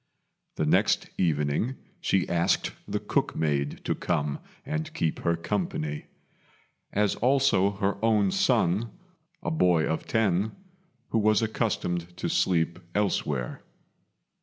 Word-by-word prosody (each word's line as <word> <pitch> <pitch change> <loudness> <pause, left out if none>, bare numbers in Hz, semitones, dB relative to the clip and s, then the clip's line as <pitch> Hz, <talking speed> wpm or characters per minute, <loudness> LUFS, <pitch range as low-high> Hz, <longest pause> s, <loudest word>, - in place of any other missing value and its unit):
The - - 0
next - - +2
evening 75 - +1 0.2
she 95 - +1
asked 85 0 +1 0.2
the - - -1
cook - - 0
maid 70 -2 -1
to - - +1
come 75 -5 -1 0.3
and 155 +2 -3
keep 80 - 0
her 85 - +1
company; 85 -5 -3 0.8
as 105 0 +2
also 125 -6 +3
her 100 +1 -1
own 105 -4 +3
son, 100 +7 +2 0.5
a - - -1
boy 90 - +3
of 80 - -2
ten, 105 -2 +1 0.6
who 115 - +2
was 110 +1 +3
accustomed 90 -6 -1
to - - -2
sleep 85 -1 +1 0.2
elsewhere. 75 -11 -1
95 Hz, 120 wpm, -27 LUFS, 80-110 Hz, 0.8 s, also